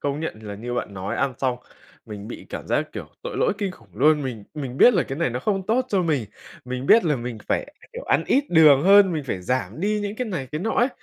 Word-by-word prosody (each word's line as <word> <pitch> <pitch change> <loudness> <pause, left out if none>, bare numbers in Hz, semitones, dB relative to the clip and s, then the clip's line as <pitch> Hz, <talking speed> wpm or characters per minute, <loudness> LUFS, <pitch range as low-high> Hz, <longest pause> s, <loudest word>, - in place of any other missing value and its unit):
công 145 +1 -2
nhận 165 - -3
thì 110 - -11
là 100 - -5
như 120 +4 -5
bạn 105 -4 -4
nói, 95 +1 -4
ăn 135 -2 0
xong 130 -2 0 0.5
mình 105 -1 -8
bị - - -9
cảm - - -7
giác - - -1
kiểu - - -7
tội - - -5
lỗi - - +2
kinh 200 -3 -1
khủng 115 - -19
luôn. 150 +5 +3
Mình 120 -6 -5
mình 135 -4 -5
biết 245 - +7
là 180 - +3
cái 135 +3 -6
này 170 - +1
nó 125 +1 -3
không 195 +4 -1
tốt 250 +3 +1
cho 195 -5 +1
mình, 150 -8 0 0.4
mình 125 +1 -5
biết 230 - +6
là 150 -4 +2
mình 120 -2 -6
phải, 285 - -2 0.2
kiểu, - - -7
ăn - - +2
ít 280 +1 +3
đường 155 -5 +6
hơn, 195 0 +6
mình 155 -3 -3
phải 95 -8 -4
giảm 115 - -2
đi 210 +2 0
những 205 +1 -4
cái 250 0 -2
này, 165 -11 -4
cái 150 - -2
nọ 225 - -1
ấy. 240 +3 +2
145 Hz, 270 wpm, -23 LUFS, 125-195 Hz, 0.5 s, biết